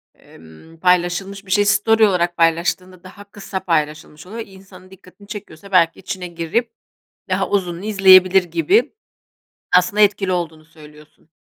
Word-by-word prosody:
emm, 80 - -18
paylaşılmış 180 +3 0
bir 190 - -10
şey, 205 +1 +3
story 220 +2 +3
olarak 175 -2 -1
paylaştığında 175 +2 -1
daha 195 +2 -13
kısa 200 -1 -7
paylaşılmış 155 -1 -3
oluyor. 225 +4 -7
İnsanın 190 -1 -17
dikkatini 190 +2 -18
çekiyorsa 200 -3 -11
belki 170 -3 +2
içine 185 -1 -6
girip 175 +8 -3 0.6
daha 190 +1 -1
uzununu 180 -3 -2
izleyebilir 190 -2 +5
gibi. 170 - 0 0.8
Aslında 180 +4 +1
etkili 200 -2 +2
olduğunu 165 -3 -4
söylüyorsun. 155 -1 -19
185 Hz, 130 wpm, -19 LUFS, 170-195 Hz, 0.8 s, izleyebilir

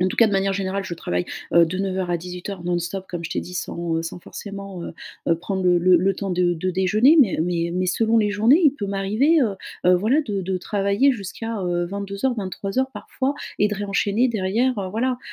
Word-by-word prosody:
en 185 - +3
tout - - -5
cas, 230 - +6
de 210 - -1
manière 195 0 +1
générale, 195 0 -2
je 180 - -5
travaille, 90 - -2 0.3
heu, 170 0 +7
de 180 +3 -4
09:00 190 -2 -2
à 175 - +2
18:00, 180 +2 -7
non-stop, 175 +2 -2
comme 175 -1 -5
je 165 - -5
t'ai - - -1
dit, 180 - -9
sans, 170 -2 -3
heu - - -2
sans 165 +2 -6
forcément, 195 0 -8
heu - - -6 0.4
heu, 165 - +4
prendre 190 +2 -3
le 180 -1 +4
le 180 +1 +5
le 190 +3 +2
temps 195 +1 -4
de 180 -1 +2
de 185 +3 -2
déjeuner. 210 - +4
Mais, 220 -10 +3
heu - - +2
mais 170 0 -1
mais 185 0 0
selon 225 +5 +2
les 210 -2 +2
journées, 225 - +4
il 290 - +6
peut 215 -8 -5
m'arriver, 215 +11 +2
heu 220 -5 +1 0.3
heu, 180 - +7
voilà, 225 - +2
de 205 -7 -3
de 185 +1 -2
travailler 200 +8 +2
jusqu'à, 225 +1 -5
heu, 175 -1 0
22:00, 200 +6 -2
23:00, 205 +5 -2
parfois, 270 +2 -3 0.2
et 205 - +3
de 210 - -2
réenchaîner 205 +4 +1
derrière, 225 +4 0
heu, 190 -2 -3
voilà. 245 +4 -1
195 Hz, 230 wpm, -22 LUFS, 180-215 Hz, 0.4 s, heu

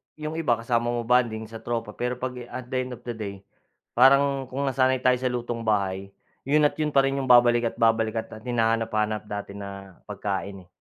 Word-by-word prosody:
'yong 155 +1 -5
iba 120 -7 +2
kasama 115 +1 -1
mo 120 0 -1
mag-bonding 115 -2 +2
sa 110 +1 -9
tropa, 115 -2 -3
pero 125 +3 -3
'pag 125 +1 -4 0.2
at 130 - -6
the 130 - 0
end 125 -1 -4
of 120 - -19
the 120 - -4
day 105 -3 -5 0.6
parang 135 +1 +4
kung 135 +2 -3
nasanay 130 -1 +1
tayo 125 -1 +4
sa 130 - 0
lutong 120 -1 -3
bahay, 100 -2 0 0.4
'yon 150 +1 +4
at 145 - +3
'yon 150 -2 -1
pa 135 - +6
rin 135 0 0
'yung 130 - -3
babalika't 120 -1 +5
babalikan, 115 0 +2
at 110 - -9
hinahanap-hanap 115 -3 0
natin 100 -1 -6
na 100 -2 -9
pagkain, 100 -2 -4
eh. - - -41
120 Hz, 200 wpm, -25 LUFS, 110-130 Hz, 0.6 s, pa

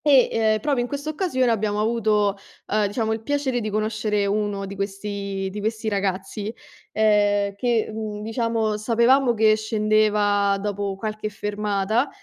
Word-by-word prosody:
E, 275 -4 +6 0.3
uhm, - - -2
proprio 275 -1 +1
in 240 - -2
quest'occasione 285 -2 -1
abbiamo 210 -1 0
avuto, 215 -2 +1 0.3
uhm, 210 0 +1
diciamo, 220 +2 -1
il 220 - -4
piacere 275 -1 -1
di 215 - -3
conoscere 215 -1 0
uno 200 -1 -1
di 195 +1 -7
questi 200 0 -4
di 210 - -5
questi 220 +1 -2
ragazzi 195 0 -2 0.5
uhm, 205 -2 +3
che, 230 +1 +1
mhmm, 215 -1 -5
diciamo, 225 -1 -1
sapevamo 235 +3 +3
che 215 0 +5
scendeva 210 -2 +2
dopo 200 -1 -3
qualche 215 +1 -4
fermata, 210 +3 -1
215 Hz, 140 wpm, -23 LUFS, 205-225 Hz, 0.5 s, E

